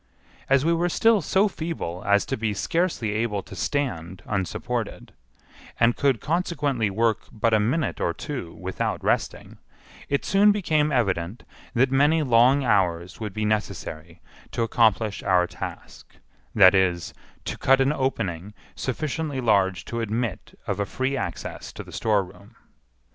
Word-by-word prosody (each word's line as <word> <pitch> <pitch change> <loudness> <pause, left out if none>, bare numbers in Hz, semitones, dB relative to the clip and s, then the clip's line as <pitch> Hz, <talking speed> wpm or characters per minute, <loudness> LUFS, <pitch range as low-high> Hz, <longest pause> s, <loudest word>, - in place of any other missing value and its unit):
As 135 +1 +4
we 170 - +3
were 175 +1 +1
still 225 +3 +3
so 195 +6 +2
feeble 160 - -5
as 100 0 +4
to - - -2
be 110 -2 -2
scarcely 165 - 0
able 105 -2 -1
to - - -11
stand 95 - -3
unsupported, 95 -3 -3 0.7
and 115 0 +4
could 135 -5 +2
consequently 145 - 0
work 110 +3 +1
but 115 0 0
a 110 - +5
minute 130 +8 0
or - - +1
two 130 - -6
without 90 +3 -3
resting, - - -1 0.5
it 140 - 0
soon 205 +2 +5
became 155 -7 +1
evident 100 -5 -1 0.3
that 130 +2 +3
many 150 +4 +3
long 130 +2 +4
hours 90 -6 +1
would 105 -2 -4
be 110 +2 -2
necessary 85 -6 -3 0.3
to 115 - -1
accomplish 110 -2 +2
our 90 -2 +3
task—that 95 - 0
is, 90 -3 +1 0.3
to - - -3
cut 135 +1 +3
an 135 +2 +3
opening 105 - -2 0.2
sufficiently 145 +2 -3
large 95 -6 +2
to 115 0 -3
admit 115 -1 -3
of - - -2
a 100 - +1
free 130 +4 -1
access 85 -10 -5
to - - -8
the - - -13
storeroom. 100 0 -2
115 Hz, 145 wpm, -25 LUFS, 95-140 Hz, 0.7 s, a